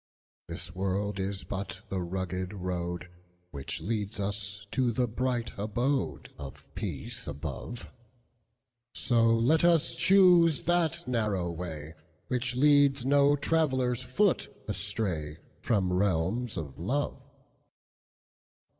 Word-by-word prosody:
This 85 - -6
world 100 +2 -1
is 95 0 -3
but 95 0 -5
the 95 -2 -2
rugged 95 +1 -3
roadWhich 90 -3 -6
leads 105 -2 -3
us 100 0 -3
to 130 -3 +2
the 125 +2 +1
bright 120 0 -2
abodeOf 110 - -2
peace - - -5
above; 75 - -6 1.1
So 115 -2 +3
let 115 +8 +3
us 165 -7 +4
choose 175 0 +5
that 170 0 +1
narrow 105 -8 0
way, 80 -3 -6 0.4
Which 125 0 -1
leads 140 -1 +4
no 140 +1 +5
traveller's 130 -5 +1
foot 170 +10 +1 0.2
astrayFrom 95 -1 -1
realms 100 +5 0
of 70 -4 -6
love. 135 +9 -1
105 Hz, 100 wpm, -29 LUFS, 90-130 Hz, 1.1 s, choose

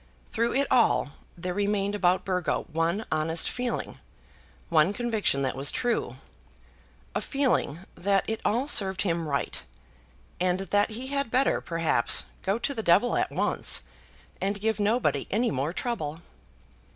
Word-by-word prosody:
Through 235 +1 0
it 280 +1 +3
all 235 - +3 0.3
there 180 +1 -3
remained 200 0 0
about 185 -3 +2
Burgo 180 -3 -1
one 170 +7 0
honest 160 +1 +2
feeling, 250 -1 -3 0.7
one 165 +3 +3
conviction 220 - 0
that 130 - -1
was 135 +2 +3
true, 240 -1 -1 1.0
a - - -1
feeling 260 - 0
that 195 +1 +1
it 220 0 -3
all 245 +6 +1
served 195 -9 +3
him 170 -4 -1
right, 140 -2 -2 0.8
and 180 +1 +1
that 205 +2 +1
he 245 +4 -6
had 280 -3 -1
better, 260 +4 +2
perhaps, 165 -8 +1 0.2
go 195 +3 0
to 260 +4 -1
the 225 - -3
devil 200 +6 +3
at - - +1
once, - - +1 0.6
and 200 +2 -1
give 220 +1 0
nobody 220 +4 +1
any 235 +4 +1
more 140 +3 -1
trouble. 165 -8 -3
200 Hz, 145 wpm, -27 LUFS, 170-235 Hz, 1.0 s, it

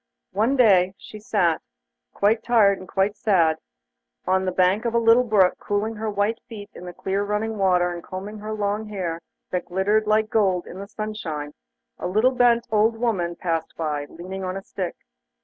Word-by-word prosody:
One 220 +8 +1
day 200 -8 +5
as 190 - -17
she 215 - -11
sat, 210 - +1 0.5
quite 215 +3 +2
tired 215 -5 +4
and 185 - -11 0.3
sad, 170 -8 +2 0.7
on 190 0 +1
the 185 - 0
bank 185 +4 +2
of 235 -1 -1
a - - +5
little 230 +2 +5
brook, 205 -6 +3
cooling 210 +2 -2
her 220 0 -2
white 205 +2 0
feet 210 -3 -9
in 180 - -10
the 180 - -6
clear 195 +3 -2
running 210 +1 -2
water, 180 -2 +2
and 170 -1 -8
combing 200 +3 -7
her 215 +1 -6
long 210 0 -2
hair 180 -5 -4 0.3
that 180 -1 -2
glittered 205 +4 +1
like 215 0 +2
gold 190 -5 +2
in 185 - -9
the 200 - -7
sunshine, 200 -9 -5 0.5
a - - -3
little 215 +8 +3
bent 240 -2 +3
old 220 +1 +3
woman 190 -8 -1
passed 165 -3 -3
by, 150 -3 -2
leaning 190 +3 -7
on 185 +1 -3
a 195 - -7
stick. 185 -3 -5
205 Hz, 185 wpm, -23 LUFS, 185-220 Hz, 0.7 s, day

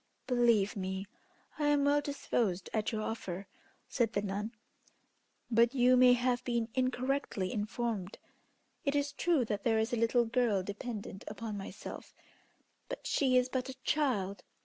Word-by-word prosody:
"Believe 235 -5 +3
me, 190 0 -3 0.5
I 295 - +2
am 290 -1 +3
well 290 +1 +4
disposed 230 -10 -1
at 215 -1 0
your 215 -1 -2
offer," 195 -4 -4 0.4
said 230 -3 0
the 200 - 0
nun; 205 +2 -3 1.0
"but 235 +3 +4
you 250 0 +5
may 250 0 +7
have 245 0 +1
been 235 -2 -1
incorrectly 255 -6 -1
informed. 210 -2 -2 0.7
It 280 0 0
is 285 0 +1
true 325 -8 +2
that 210 -2 -3
there 225 -2 +3
is 220 +2 0
a - - +2
little 230 +1 +3
girl 225 -4 +1
dependent 205 0 -6
upon 225 -2 -5
myself, 195 0 -8 0.7
but - - -6
she 260 -3 +3
is 250 0 +3
but 255 0 -2
a 260 - -6
child. 200 -11 0
235 Hz, 150 wpm, -32 LUFS, 205-255 Hz, 1.0 s, may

